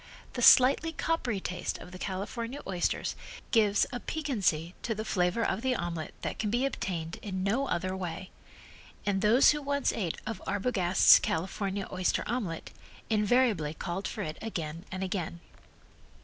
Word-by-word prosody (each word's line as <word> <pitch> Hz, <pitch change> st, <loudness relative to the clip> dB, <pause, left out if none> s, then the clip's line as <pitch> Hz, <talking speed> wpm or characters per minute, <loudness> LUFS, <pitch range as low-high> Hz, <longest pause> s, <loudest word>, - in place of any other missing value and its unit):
The 245 Hz, -, -3 dB
slightly 270 Hz, +7 st, +6 dB
coppery 285 Hz, -10 st, -1 dB
taste 180 Hz, -1 st, -3 dB
of 180 Hz, -, -11 dB
the 185 Hz, -, -9 dB
California 230 Hz, +8 st, -4 dB
oysters 180 Hz, -3 st, -1 dB, 0.4 s
gives 210 Hz, -3 st, +4 dB
a 245 Hz, -, -2 dB
piquancy 200 Hz, -, -1 dB
to 225 Hz, -, -2 dB
the 215 Hz, +1 st, -4 dB
flavor 180 Hz, +3 st, +1 dB
of 195 Hz, -, -1 dB
the 260 Hz, 0 st, +1 dB
omelet 170 Hz, -5 st, -4 dB
that -, -, -3 dB
can 210 Hz, -, 0 dB
be 240 Hz, +5 st, +1 dB
obtained 170 Hz, -10 st, -3 dB
in 190 Hz, -3 st, -3 dB
no 235 Hz, +8 st, +1 dB
other 185 Hz, -1 st, -1 dB
way, 185 Hz, 0 st, -5 dB, 0.7 s
and 195 Hz, -1 st, +1 dB
those 225 Hz, +6 st, +6 dB
who 295 Hz, 0 st, -2 dB
once 280 Hz, 0 st, 0 dB
ate 180 Hz, -7 st, -2 dB
of 220 Hz, -3 st, -4 dB
Arbogast's 190 Hz, -4 st, +5 dB
California 195 Hz, +3 st, -2 dB
oyster 185 Hz, -1 st, 0 dB
omelet, 210 Hz, -9 st, -3 dB, 0.4 s
invariably 210 Hz, -7 st, +2 dB
called 180 Hz, +4 st, -3 dB
for 210 Hz, -, -4 dB
it 155 Hz, -2 st, -5 dB
again 165 Hz, -5 st, -5 dB
and 190 Hz, -1 st, -3 dB
again. 180 Hz, -3 st, -3 dB
200 Hz, 155 wpm, -30 LUFS, 180-235 Hz, 0.7 s, slightly